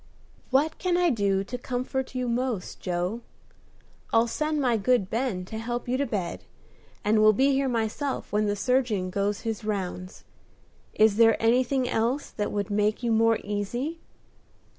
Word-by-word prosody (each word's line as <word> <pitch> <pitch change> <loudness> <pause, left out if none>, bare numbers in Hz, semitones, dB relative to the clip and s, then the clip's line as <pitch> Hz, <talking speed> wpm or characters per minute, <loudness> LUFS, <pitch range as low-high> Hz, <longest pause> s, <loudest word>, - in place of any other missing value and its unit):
"What 285 +4 +1
can 360 -2 +1
I 350 -2 +3
do 200 -4 +1
to 240 +6 -5
comfort 255 +1 -3
you 250 -1 -1
most, 240 -4 -2
Joe? 180 +5 -2 0.9
I'll 225 +1 +4
send 305 +5 -1
my 250 -4 +2
good 220 -2 +1
Ben 225 -6 -1
to 220 +4 -6
help 240 +2 -4
you 250 - 0
to 280 +1 0
bed, 185 -6 -3 0.6
and 215 +1 +3
will 215 0 +6
be 270 +6 +3
here 270 0 +1
myself 235 +2 -2
when 210 0 +2
the 205 - 0
surgeon 220 -5 0
goes 200 +1 -1
his 225 -2 -4
rounds. 185 -3 -4 0.7
Is 215 -1 +4
there 225 -1 +5
anything 250 +3 +2
else 245 +4 -1
that 210 - -3
would 205 -1 -2
make 210 +3 +1
you 235 - +1
more 225 0 +4
easy?" 240 +10 -3
225 Hz, 160 wpm, -26 LUFS, 205-255 Hz, 0.9 s, will